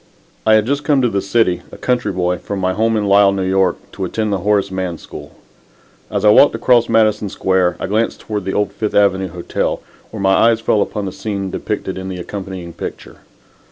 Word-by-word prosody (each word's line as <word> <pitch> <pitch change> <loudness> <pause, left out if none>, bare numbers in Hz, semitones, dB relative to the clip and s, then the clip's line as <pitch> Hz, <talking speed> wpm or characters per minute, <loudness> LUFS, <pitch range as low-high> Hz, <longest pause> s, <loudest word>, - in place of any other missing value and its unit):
I 110 - +6
had 110 -1 +3
just 140 +3 -1
come 145 -4 +2
to 120 - +3
the 100 -2 -1
city, 100 -2 +1
a - - -10
country 125 -3 0
boy, 90 -1 -1
from 100 - -5
my 95 -1 0
home 110 +2 +1
in 105 - 0
Lisle, 100 0 +4
N. 95 - -1
Y., 95 -2 +4 0.2
to 95 - -6
attend 105 +3 -2
the 100 - 0
Horace 100 0 +1
Mann 95 -3 -3
School. - - -11 0.7
As - - -1
I 105 - +7
walked 145 - +6
across 120 -2 +3
Madison 110 -2 +2
Square, 95 -2 +1
I - - -3
glanced 110 +4 -1
toward 105 -4 -4
the 95 - -1
old 105 - 0
Fifth 110 -1 -3
Avenue 95 -2 +3
Hotel, 85 0 -3 0.3
where 110 - -8
my 95 0 +3
eyes 115 +3 +4
fell 110 -2 +1
upon 105 0 -2
the 95 - -4
scene 100 -1 -4
depicted 95 -2 -4
in 95 0 -6
the 95 - -5
accompanying 95 -2 -7
picture. - - -8
100 Hz, 215 wpm, -17 LUFS, 95-110 Hz, 0.7 s, I